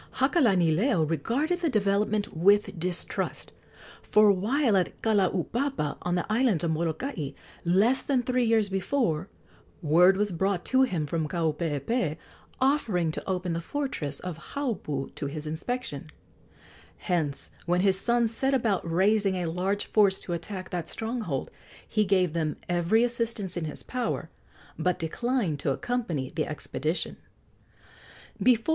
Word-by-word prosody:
Hakalanileo 200 - +3
regarded 280 - 0
the 340 -2 +1
development 205 - +1
with 200 +2 +3
distrust; 175 +1 -2 0.5
for 210 -1 +5
while 220 +5 +2
at 185 -2 0
Kalaupapa, 210 - 0
on 175 0 -1
the 175 - 0
island 215 -6 +2
of 165 - +1
Molokai, 160 - -2 0.3
less 205 +9 +4
than 260 -3 +1
three 250 0 +1
years 225 -2 +3
before, 195 - -1 0.5
word 175 +5 +5
was 205 0 +1
brought 185 +1 -1
to 260 0 +3
him 185 -13 +1
from 160 +1 -1
Kaupeepee, 160 - -1 0.4
offering 225 - +2
to 155 - -6
open 180 -2 -1
the 165 - -2
fortress 170 - -3
of 180 - -8
Haupu 210 - -3
to 145 - -4
his 150 +2 -5
inspection. 155 - -4 0.9
Hence, 155 -6 -2 0.2
when 175 +1 +2
his 190 -1 +3
sons 235 +1 +2
set 270 +4 +1
about 205 -9 0
raising 195 +2 +3
a 180 -1 -2
large 185 +5 -1
force 200 -3 +3
to 175 - -4
attack 185 +3 -5
that 175 -2 -3
stronghold, 220 - -3 0.4
he 215 -1 +1
gave 185 -4 +2
them 155 -3 -1
every 175 +6 +2
assistance 230 -6 -1
in 175 -2 -2
his 150 - -6
power, 250 -3 -3 0.5
but 180 -1 +1
declined 190 - -1
to 145 - -1
accompany 165 - -2
the 155 -1 -2
expedition. 155 +2 -3
190 Hz, 135 wpm, -27 LUFS, 165-230 Hz, 0.9 s, for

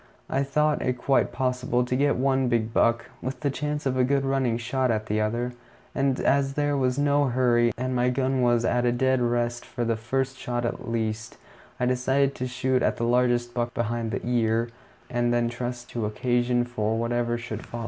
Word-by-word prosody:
I 135 - +1
thought 150 +2 +1
it 125 0 -1
quite 135 +2 +2
possible 125 -1 0
to 125 - -1
get 140 +2 +2
one 135 0 +1
big 115 -2 0
buck, 115 0 +2 0.2
with 130 0 -5
the 140 - 0
chance 150 +1 -3
of 130 -1 0
a 130 - +4
good 135 +1 +1
running 135 -4 +1
shot 125 +2 -1
at 110 -2 0
the 110 0 0
other; 120 +3 -1 0.4
and 135 -1 +1
as 135 -1 +2
there 145 0 0
was 130 -1 +1
no 145 0 +3
hurry, 120 -2 +3
and 130 +1 -2
my 125 0 +2
gun 130 0 0
was 120 -1 +3
at 120 0 +1
a 120 - +3
dead 130 +1 +1
rest 120 0 0
for 120 -2 -4
the 115 0 +1
first 135 +4 -2
shot 120 -1 -2
at 120 - -4
least, 110 -1 -3 0.4
I 125 - +1
decided 130 +2 +1
to 130 - -4
shoot 130 +1 0
at - - +1
the - - -2
largest 120 0 +2
buck 120 0 -2
behind 115 0 -1
the - - -4
ear, 115 -1 +1 0.4
and 120 -1 0
then 120 -1 +1
trust 120 0 -5
to 115 -3 -2
occasion 120 +2 +1
for 110 -2 -1
whatever 120 0 0
should 115 -2 -6
follow. 120 - -7
125 Hz, 205 wpm, -26 LUFS, 120-130 Hz, 0.4 s, a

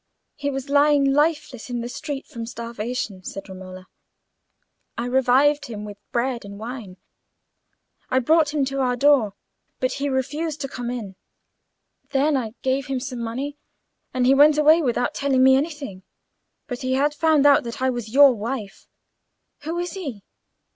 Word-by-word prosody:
"He 285 -1 -3
was 270 0 -4
lying 285 -1 +4
lifeless 295 -5 0
in 240 -1 -2
the 235 - -4
street 285 +2 -5
from 230 -6 -7
starvation," 230 -4 -5
said 195 +2 -7
Romola. 185 -1 -10 1.1
"I 235 - -2
revived 265 +3 +3
him 210 -3 -6
with 205 -1 -9
bread 240 0 -1
and 200 0 -9
wine. 220 -4 -7 1.1
I 255 - +1
brought 305 +4 +3
him 290 -2 +1
to 275 +1 -3
our 250 -2 +1
door, 245 -6 +3 0.4
but 255 - 0
he 285 0 -2
refused 295 +4 -2
to 275 - -2
come 245 -2 -5
in. 215 -6 -6 0.9
Then 285 +2 +2
I 230 -4 -2
gave 265 +1 0
him 270 -1 -1
some 255 -1 -6
money, 265 +6 -4 0.5
and 255 -1 0
he 260 - +6
went 295 +2 +6
away 310 +2 +6
without 245 -3 0
telling 270 -2 +2
me 265 0 +7
anything. 275 - -3 0.6
But 245 -3 -5
he 260 -1 -1
had 285 +3 +2
found 315 -2 +3
out 285 -1 +6
that 235 +4 -6
I 260 0 +1
was 240 -3 -5
your 280 +1 +7
wife. 220 -2 -5 0.8
Who 330 +2 -3
is 350 0 -2
he?" 275 - -6
260 Hz, 165 wpm, -23 LUFS, 235-285 Hz, 1.1 s, me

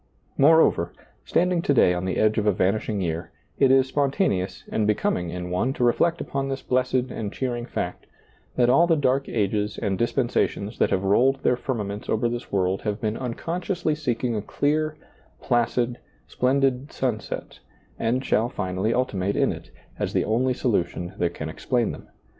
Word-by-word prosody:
Moreover, 145 - +4 0.3
standing 180 0 +2
to 145 - +1
day 90 - +5
on 90 +1 -3
the 95 - -1
edge 110 0 +3
of 105 - -1
a - - +6
vanishing 100 +2 0
year, 85 -1 -3 0.3
it 135 - +5
is 135 0 +5
spontaneous 135 - 0
and 105 -1 +1
becoming 90 -4 0
in 90 +1 -5
one 115 +9 0
to 125 - -2
reflect 165 +8 +2
upon 135 0 -3
this 135 0 -4
blessed 130 0 0
and 105 -3 -4
cheering 120 -1 -3
fact, - - -4 0.5
that 120 -1 +3
all 140 +8 +5
the 165 - +4
dark 135 -2 +1
ages 105 -1 -1
and 100 -3 -2
dispensations 120 -3 0
that - - +3
have 95 - 0
rolled 130 +8 +3
their 125 - +3
firmaments 105 -5 -4
over 110 +2 +1
this 120 +1 -5
world 95 -1 +1
have 105 -1 -2
been 110 0 -1
unconsciously 165 - -2
seeking 125 -5 -1
a 105 - -1
clear, 155 +7 0 0.4
placid, 120 0 0 0.3
splen 130 +2 +1
did 135 +1 0
sunset, 120 -5 -3 0.4
and 125 +4 0
shall 115 +3 +2
finally 95 +1 -1
ultimate 100 -6 0
in - - +2
it, - - -9 0.3
as - - -2
the - - +1
only 125 +4 +1
solution 90 -7 -1
that 85 - 0
can 75 - -5
explain 120 +8 -1
them. - - -10
120 Hz, 175 wpm, -24 LUFS, 100-135 Hz, 0.5 s, a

